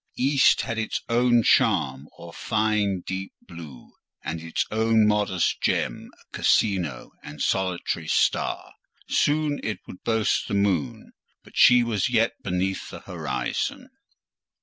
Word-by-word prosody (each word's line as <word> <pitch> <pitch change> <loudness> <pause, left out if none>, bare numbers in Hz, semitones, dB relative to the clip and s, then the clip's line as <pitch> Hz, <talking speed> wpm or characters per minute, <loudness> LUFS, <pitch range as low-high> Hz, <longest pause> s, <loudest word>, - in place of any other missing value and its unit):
The - - -3
east 140 0 +4
had 115 0 -3
its 110 - -2
own 120 0 +3
charm 70 -5 +2
or 85 0 -11
fine 105 -3 0
deep 95 +2 -6
blue, 80 -7 -12 0.3
and 80 +1 -4
its 85 0 -2
own 110 0 +3
modest 105 -4 +1
gem, - - -1 0.2
a - - -6
rising 90 - +1
and 75 0 -11
solitary 95 +1 -1
star: - - 0 0.3
soon 150 0 +1
it 105 - -3
would 90 - -12
boast 110 -2 0
the 100 - -2
moon; 100 -6 -1 0.3
but - - -18
she 125 -1 +6
was 110 -5 -1
yet 115 -1 +2
beneath 95 0 -2
the - - -9
horizon. - - -4
100 Hz, 135 wpm, -24 LUFS, 90-115 Hz, 0.3 s, she